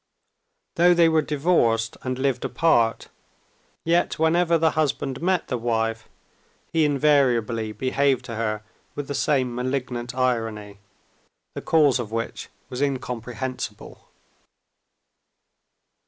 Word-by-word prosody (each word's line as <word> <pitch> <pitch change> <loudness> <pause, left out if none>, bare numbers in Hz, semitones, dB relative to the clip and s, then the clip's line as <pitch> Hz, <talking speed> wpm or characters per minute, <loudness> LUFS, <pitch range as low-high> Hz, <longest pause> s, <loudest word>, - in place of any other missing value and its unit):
Though 175 +1 +5
they 170 -1 +5
were 160 -1 +3
divorced 140 -8 +1
and 130 -1 -3
lived 130 -2 -1
apart, 120 -9 +1 0.8
yet 170 +1 +1
whenever 170 +1 +3
the 160 0 +2
husband 140 -3 -1
met 180 0 0
the 125 - -2
wife, 115 -1 -1 0.6
he 160 -2 +3
invariably 125 -7 +2
behaved 130 +3 0
to 120 - -6
her 110 -1 -2 0.3
with 145 -1 -5
the 145 - -3
same 130 -4 +1
malignant 125 -1 -3
irony, 115 -5 -2 0.7
the - - -6
cause 150 -5 +3
of 110 -3 -5
which 115 0 -4 0.2
was 125 +1 -6
incomprehensible. 125 -2 -4
130 Hz, 110 wpm, -24 LUFS, 115-150 Hz, 0.8 s, Though